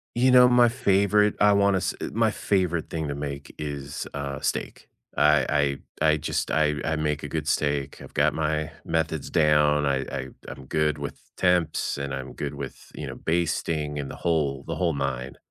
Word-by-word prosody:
You 125 +2 +4
know, 125 0 +8
my 125 -1 +6
favorite 105 -3 +3
I 105 0 +6
wanna 100 -1 +3
s 95 - -1 0.2
my 110 0 +2
favorite 90 -6 0
thing 80 -2 -3
to 70 - -3
make 70 -1 -6
is, 70 -1 -5
uh, 70 0 -4
steak. - - -3 0.3
I 75 -1 +3 0.2
I - - +3
I 75 - +2
just, 75 - -2
I 75 -1 +2
I 80 0 0
make 75 -1 -1
a 75 - -5
good 75 0 -3
steak. 70 -3 -1
I've - - -12
got - - +2
my 80 0 -1
methods 80 -2 -1
down. 75 -1 +3
I 70 -1 +1
I - - -4 0.2
I'm 65 +2 -9
good 75 +1 0
with 70 0 -8
temps, 90 -6 +1
and 70 -1 -4
I'm 65 -1 -5
good 70 0 -5
with, 70 -1 -8
you - - -6
know, - - -6
basting 80 -3 -1
and 70 -2 -5
the - - -9
whole, 75 -5 0
the - - -3
whole 85 -3 +1
9, 70 -2 -3
75 Hz, 190 wpm, -25 LUFS, 70-85 Hz, 0.3 s, know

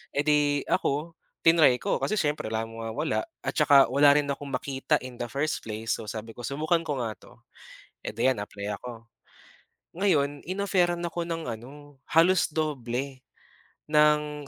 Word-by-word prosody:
Eh, 140 - +3
di 145 -1 +2
ako, 155 +4 -1 0.2
tinry 160 -7 +5
ko 200 - 0
kasi - - -2
siyempre 150 - 0
wala 110 0 -2
naman 115 0 -7
mawawala 160 - -1 0.2
at - - -4
saka 140 -3 +6
wala 140 +2 +6
rin 145 -1 +1
akong 140 -1 -4
makita 135 +1 -1
in 125 -1 -9
the 120 - -3
first 140 +5 -2
place, 110 +1 -2
so 110 - -8
sabi 110 +1 -7
ko, 120 - -6
"Subukan 155 +4 0
ko 140 -5 -2
nga 110 -2 -4
'to," - - -19 0.6
Eh, - - -4
di 115 +4 +1
'yan 130 - +2
apply 100 0 -5
ako. 115 -1 -10 0.9
Ngayon 145 -8 +1
in-offeran 185 -2 0
ako 170 0 -3
ng 165 -5 -4
ano, 140 +5 -10
halos 170 +3 +4
doble, 135 -3 -2 0.7
ng 150 -1 +3
145 Hz, 165 wpm, -27 LUFS, 125-155 Hz, 0.9 s, saka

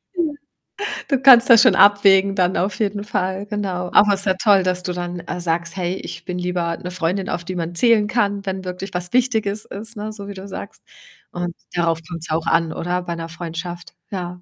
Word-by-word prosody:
Ja. 340 -4 0 0.8
Du 275 -3 +2
kannst 255 -3 +8
das 230 -2 +9
schon 235 -6 +5
abwägen 200 -1 +5
dann, 185 -1 +1
auf 190 +2 -1
jeden 205 -1 -1
Fall, 190 -1 -2
genau. 195 -4 -3
Aber 205 0 +6
ist 195 0 0
ja 190 -2 +2
toll, 200 -1 +4
dass 180 0 -1
du 180 - -3
dann, 175 0 -4
äh, 180 - -5
sagst: 170 0 -1
„Hey, 180 -1 -2
ich - - -8
bin 180 -1 -4
lieber 180 -2 -2
'ne 180 - -7
Freundin, 185 +2 -2
auf 175 - -3
die 185 +2 -6
man 170 0 -4
zählen 220 +1 +4
kann, 205 -3 0
wenn 190 -1 -3
wirklich 185 +1 -6
was 180 0 -3
Wichtiges 220 -5 +1
ist.“, 220 +3 -8
ne, 210 +1 -4
so 200 -2 -9
wie 200 - -6
du 195 0 -9
sagst. 200 +1 -9 0.5
Und 175 -1 -4 0.2
darauf 170 -2 +1
kommt's 165 -1 -7
auch 160 +1 -1
an, 165 -1 +2
oder, 180 +1 -2
bei 170 -1 -4
'ner 165 0 -6
Freundschaft? 175 +1 -7 0.2
Ja. 180 -2 -5
185 Hz, 210 wpm, -20 LUFS, 175-205 Hz, 0.8 s, das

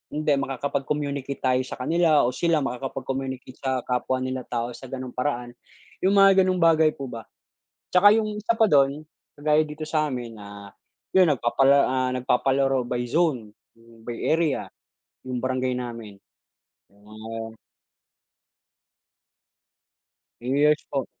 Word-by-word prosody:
hindi 150 0 0
makakapag-communicate 140 +1 -3
tayo 130 -1 +2
sa - - -6
kanila 155 +3 +2
o 120 - +1
sila 165 +1 +1
makakapag-communicate 130 0 -5
sa 130 -2 -2
kapwa 130 +1 -1
nila 130 -1 -4
tao 120 0 -2
sa 130 +2 -10
gano'ng 130 0 -6
paraan. 125 -2 -3 0.5
'Yong 190 +2 +2
mga 195 -1 +6
gano'ng 185 -1 0
bagay 160 -2 +4
po 135 -2 -6
ba. 115 -1 -8 0.7
'Tsaka 190 +3 +7
yung 215 -1 -2
isa 230 +2 0
pa 220 - +5
do'n, 145 -2 +2 0.3
kagaya 150 +1 +3
dito 155 0 -7
sa 155 -1 0
amin, 120 -3 -5
ah, 100 -1 -11 0.4
'yun 185 -3 +5
nagpapala 135 +1 +3
ah, 130 0 0
nagpapalaro 135 +1 +1
by 120 0 -3
zone, 130 -7 0 0.5
by 120 +1 -6
area, 155 -10 0 0.6
yung 125 - -3
barangay 130 -1 -1
namin 115 -4 -7 0.8
yung 100 +1 -25
mga 110 +1 -8 2.8
Yes 145 +5 +2
po. 135 -3 -2
135 Hz, 130 wpm, -24 LUFS, 125-150 Hz, 2.8 s, Tsaka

